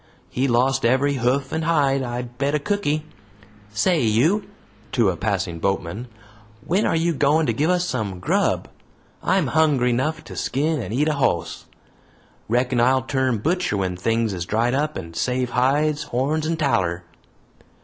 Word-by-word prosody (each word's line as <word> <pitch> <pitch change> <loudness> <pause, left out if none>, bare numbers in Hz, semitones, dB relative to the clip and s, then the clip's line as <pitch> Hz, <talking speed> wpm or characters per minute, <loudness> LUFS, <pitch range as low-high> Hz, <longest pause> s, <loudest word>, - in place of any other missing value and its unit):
He 130 +2 0
lost 130 +2 +2
every 130 +4 +3
hoof 130 +3 0
and 160 0 -1
hide, 145 -4 +2
I'll 120 -1 -3
bet 135 +4 -2
a - - +1
cooky! 155 -4 -1 0.7
Say 160 - +2
you," 145 - +2 0.4
to 115 -6 +3
a - - -5
passing 95 -4 -2
boatman, 95 +5 -2 0.6
"when 190 +6 +1
are - - +1
you 165 +1 +1
goin' 150 +3 +2
to - - +1
give 155 +3 0
us 180 0 +2
some 100 - -3
grub? - - 0 0.5
I'm 190 -4 +2
hungry 140 -4 +2
'nough 155 +6 -1
to - - -10
skin 150 +1 -1
and 110 - -6
eat 140 +7 +1
a 155 - +2
hoss. 130 - -1 0.8
Reckon 125 +1 +1
I'll 130 +1 +3
turn 130 -2 0
butcher 175 - 0
when 95 -2 -1
things 115 +3 0
is 85 -1 -4
dried 115 +3 +1
up, 150 +3 -1
and 85 0 -8
save 125 +6 -1
hides, 145 +4 +2
horns, 150 +5 -1
and 165 0 -1
taller." 95 - 0
130 Hz, 165 wpm, -22 LUFS, 115-155 Hz, 0.8 s, every